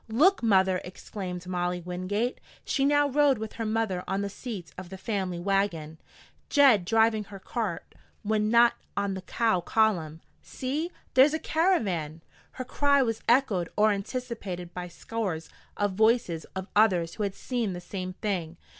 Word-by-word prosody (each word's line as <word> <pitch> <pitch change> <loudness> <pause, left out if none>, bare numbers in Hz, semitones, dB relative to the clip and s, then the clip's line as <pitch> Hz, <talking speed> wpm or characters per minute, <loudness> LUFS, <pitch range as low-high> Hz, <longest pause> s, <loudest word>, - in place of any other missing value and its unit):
"Look, 325 - +4
mother!" 190 -5 +3
exclaimed 180 -1 -7
Molly 180 0 -1
Wingate 185 +7 -2 0.3
she 275 - +1
now 290 0 +4
rode 285 -1 +3
with 220 0 -6
her 225 -1 -3
mother 215 -5 -1
on 195 - -1
the 200 - -4
seat 200 - -7
of 185 -1 -9
the 190 - -8
family 190 -3 -2
wagon, 175 -4 -1 0.5
Jed 265 - +5
driving 220 0 +3
her 200 0 -10
cart 200 -3 -4 0.3
when 215 0 +1
not 235 +1 +6 0.2
on 200 -1 0
the 190 - -5
cow 220 +1 +1
column. 170 -6 +1 0.2
"See! 295 +7 -3 0.2
There's 275 +4 +6
a - - -2
caravan!" 195 - 0 0.3
Her 255 - -6
cry 280 +1 +3
was 225 -2 -2
echoed 225 -9 +3
or 215 +1 +5
anticipated 200 -5 -5
by 180 -1 -5
scores 180 -2 -4 0.3
of 205 -1 +1
voices 220 -5 +2
of 190 0 -4
others 180 -6 +3
who - - -6
had 200 -2 -1
seen 235 -6 -2
the 175 - -5
same 185 0 -6
thing. 175 -5 -3
205 Hz, 160 wpm, -27 LUFS, 180-235 Hz, 0.5 s, not